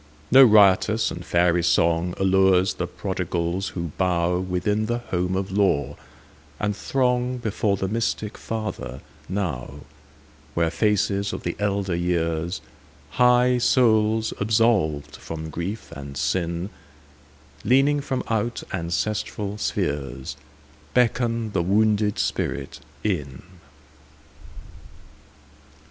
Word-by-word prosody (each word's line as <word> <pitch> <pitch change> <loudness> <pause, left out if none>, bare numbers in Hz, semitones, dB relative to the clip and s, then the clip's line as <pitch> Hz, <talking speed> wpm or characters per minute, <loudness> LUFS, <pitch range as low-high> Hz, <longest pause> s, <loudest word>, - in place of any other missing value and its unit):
No 135 +1 +9
riotous 105 -1 +5
and 85 - -6
fairy 85 +1 +2
songAllures 90 +3 +2
the - - -2
prodigals 85 +3 -2
who 85 -2 -3
bowWithin 90 +3 0
the 120 +1 0
home 90 -5 -2
of 95 0 -2
law, 95 -8 +1 0.6
and 105 0 0
throngBefore 125 -3 0
the 95 - -2
mystic 110 0 -2
Father 105 - -5 0.3
now, 75 -8 -3 0.7
Where 85 -1 +1
faces 100 +2 +1
of - - -6
the 85 - -2
elder 100 -3 0
years, 85 0 -1 0.5
High 125 +6 +4
souls 110 -3 +3
absolved 100 -9 +1
from 80 -1 -7
grief 95 +8 -5
and 70 0 -8
sin, 85 +5 -1 0.9
Leaning 135 +6 +3
from 135 -2 -3
out 115 +1 -1
ancestral 100 +3 -2
spheresBeckon 75 - -2
the 95 - +1
wounded 105 +2 +2
spirit 70 -1 -2 0.2
in. 75 -11 -2
95 Hz, 95 wpm, -24 LUFS, 85-110 Hz, 0.9 s, No